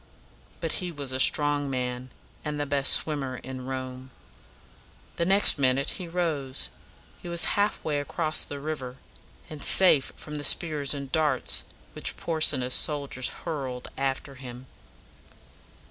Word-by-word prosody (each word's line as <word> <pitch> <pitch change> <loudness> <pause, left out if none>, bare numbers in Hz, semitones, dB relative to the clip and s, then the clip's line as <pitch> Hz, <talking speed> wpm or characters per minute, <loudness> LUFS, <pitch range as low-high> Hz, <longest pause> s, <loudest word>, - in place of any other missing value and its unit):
But - - -1
he 180 -1 -4
was 140 -4 -5
a 130 - -3
strong 145 +1 +3
man, 125 -1 -4 0.3
and 150 0 -4
the 145 - -1
best 140 -1 +2
swimmer 140 -4 +1
in 130 0 -8
Rome. 130 0 -6 1.1
The 170 - 0
next 195 -5 +5
minute 135 +1 +1
he 180 - -6
rose. 160 -7 -2 0.5
He 175 - -8
was 170 0 +4
half 205 +1 +1
way 150 -2 -1
across 155 +2 0
the 145 - -6
river, 135 -4 -5 0.5
and 155 -2 -9
safe 170 -8 +5
from 150 -1 -8
the 145 - -4
spears 150 -3 +1
and 140 -1 -7
darts 150 -5 +2 0.3
which - - -4
Porsena's 145 -6 +3
soldiers 140 -4 +1 0.2
hurled 135 -6 -5
after 135 +1 -3
him. 130 -1 -10
140 Hz, 140 wpm, -27 LUFS, 130-155 Hz, 1.1 s, next